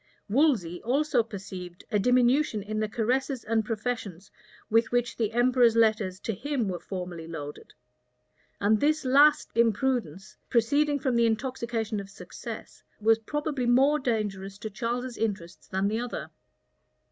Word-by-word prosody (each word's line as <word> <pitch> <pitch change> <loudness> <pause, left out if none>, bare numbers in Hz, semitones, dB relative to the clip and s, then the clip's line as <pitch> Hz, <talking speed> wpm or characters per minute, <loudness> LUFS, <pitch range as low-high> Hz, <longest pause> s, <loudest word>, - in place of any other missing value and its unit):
[*] - - -40
Wolsey 210 - +2
also 270 +1 +2
perceived 190 -5 -8
a 210 - +2
diminution 250 0 +3
in 215 +1 -3
the 215 -1 -1
caresses 250 +3 -1
and 225 0 +1
professions 210 -4 -4 0.4
with 225 +1 +2
which 245 0 0
the 225 -2 -1
emperor's 240 -1 +4
letters 215 -5 +2
to 225 - -2
him 255 +1 -2
were 180 -2 -3
formerly 180 -4 -6
loaded; 150 -3 -8 0.8
and 210 +1 +3
this 305 +2 +1
last 285 +3 +5
imprudence, 225 - 0
proceeding 285 +5 +2
from 260 -3 -1
the 235 0 +4
intoxication 230 -2 -2
of 195 -1 -8
success, 200 - -9 0.2
was 225 +1 +4
probably 290 +1 -2
more 270 +5 +4
dangerous 205 -6 -2
to 215 +1 -6
Charles's 240 +4 -3
interests 195 -6 -3
than 190 +1 0
the 220 +2 -1
other. 200 - -5
225 Hz, 145 wpm, -27 LUFS, 200-250 Hz, 0.8 s, last